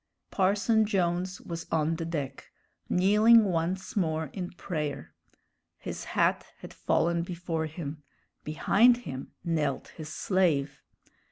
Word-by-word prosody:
Parson 210 +3 +3
Jones 185 -2 0
was 165 -1 -7
on 160 0 +1
the 165 - -3
deck, 145 -5 -5 0.4
kneeling 210 +5 +6
once 180 +1 -2
more 160 -6 -1
in 180 -2 -4
prayer. 155 -5 -5 0.6
His - - -6
hat - - +2
had - - -11
fallen 170 0 +1
before 170 -2 -3
him; 155 -1 -7 0.4
behind 220 +10 +4
him 130 0 -7
knelt 155 -5 -1
his 155 -1 -9
slave. 155 -5 0
170 Hz, 115 wpm, -28 LUFS, 155-190 Hz, 0.6 s, kneeling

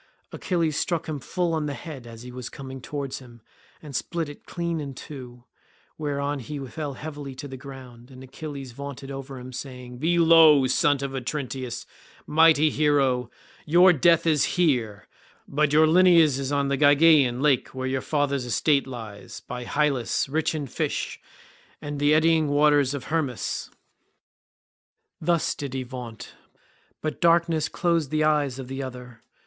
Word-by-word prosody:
Achilles 165 -4 -1
struck 170 -3 -1
him 155 -2 -3
full 175 +5 -2
on 155 -2 -1
the 140 - -4
head 140 -7 -9
as 115 0 -11
he 125 - -9
was 125 -1 -7
coming 135 -1 -8
on - - -11
towards 140 -1 -5
him, 120 -3 -15 0.4
and 145 -3 -8
split 165 +3 -2
it 145 - -13
clean 170 -1 -3
in 140 -3 -6
two; 125 -4 -10 0.5
whereon 145 -1 -2
he 145 +4 -6
fell 145 +2 -5
heavily 145 -3 -7
to 145 - -7
the 135 - -8
ground 130 -2 -11
and 130 -1 -12
Achilles 135 0 -8
vaunted 140 +1 -8
over 135 0 -7
him 125 +1 -9
saying, 125 -1 -8
"You 125 - -11
be 170 +4 +1
low, 160 -4 +7
son 140 +2 +3
of 140 - -3
Otrynteus, 130 -2 -4 0.4
mighty 155 -1 +5
hero; 135 -5 +2 0.3
your 175 +4 +6
death 165 +2 +4
is 155 -3 +2
here, 120 - +1 0.4
but 150 +1 +1
your 155 +1 +6
lineage 165 -4 +5
is 135 0 -3
on 140 -1 +1
the 140 - 0
Gygaean 145 -3 +5
lake 140 -3 +2
where 130 0 -3
your 130 0 -1
father's 140 -3 -1
estate 140 +3 +1
lies, 110 -5 -9
by 125 0 -7
Hyllus, 140 -5 0
rich 160 +3 -1
in 150 -2 -3
fish, 130 - -3 0.6
and 145 -1 -5
the 145 +1 +4
eddying 160 0 +3
waters 145 -1 +3
of 135 - -5
Hermus." 150 -7 -2 1.5
Thus 170 0 +1
did 140 -2 -6
he 130 - -2
vaunt, 125 -3 -9 0.7
but 155 - -3
darkness 165 -2 +3
closed 170 -5 0
the 155 +1 +1
eyes 150 -4 +1
of 130 -2 -7
the 135 +1 -5
other. 125 -3 -8
140 Hz, 165 wpm, -25 LUFS, 130-155 Hz, 1.5 s, low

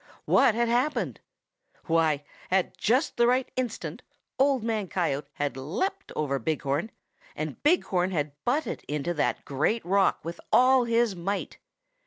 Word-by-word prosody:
What 220 - +4
had 235 0 +2
happened? 250 +6 0 0.7
Why, 160 -3 +2 0.3
at 185 0 +1
just 255 +8 +1
the 235 0 +4
right 255 +1 +2
instant 250 -4 -3 0.4
Old 270 -3 +3
Man 220 -3 -1
Coyote 150 -6 -1
had 145 -1 -2
leaped 200 - -3
over 140 -3 -1
Big 155 +6 -2
Horn, 145 +9 -1 0.5
and - - -5
Big 340 +5 +4
Horn 180 -1 0
had 150 -5 -1
butted 285 +6 -1
into 150 +3 -2
that 150 - -1
great 155 - 0
rock 195 -1 +2
with 170 +1 -6
all 255 0 +5
his 230 -3 +2
might. 195 +4 -3
195 Hz, 150 wpm, -27 LUFS, 155-245 Hz, 0.7 s, all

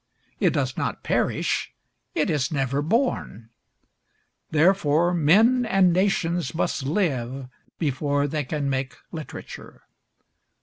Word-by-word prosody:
It - - +3
does - - -1
not - - -3
perish; - - -1 0.4
it 205 - +1
is 145 -2 0
never 140 -1 0
born. 155 - -1 1.0
Therefore 165 0 +3
men 210 - +4
and 195 -6 +3
nations 175 -5 0
must 160 - -1
live 135 - -1 0.3
before 145 -1 0
they 150 +1 -2
can 140 +1 -3
make 130 -1 -2 0.2
literature. 160 -3 -9
155 Hz, 105 wpm, -24 LUFS, 140-180 Hz, 1.0 s, men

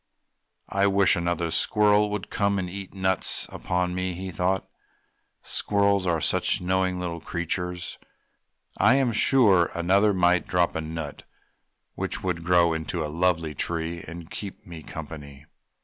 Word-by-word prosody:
"I 100 0 +2
wish 100 -1 +4
another 85 -1 -1
squirrel 105 +4 +4
would 105 -2 -5
come 100 -1 +1
to 95 - -1
eat 95 +2 -7
nuts 95 -1 -1
upon 90 0 -2
me!" 90 0 -2
he 95 +1 -6
thought. 90 +3 -1 0.8
"Squirrels 100 -2 +1
are 85 -2 +1
such - - +2
knowing 95 0 0
little 85 -2 -4
creatures, 90 +1 -3 0.8
I 130 - +5
am 135 -3 +2
sure 105 -6 +4
another 95 +5 +3
might 90 -2 +2
drop 90 -1 +1
a 80 - -2
nut 80 -2 -6 0.7
which - - -4
would 90 -3 -2
grow 85 -1 +4
into 80 +1 -3
a 75 - -6
lovely 85 -2 +1
tree 85 +3 -2
to 85 +1 -9
keep 100 +1 -8
me 85 -4 -9
company." 75 -2 -9
90 Hz, 145 wpm, -25 LUFS, 85-95 Hz, 0.8 s, I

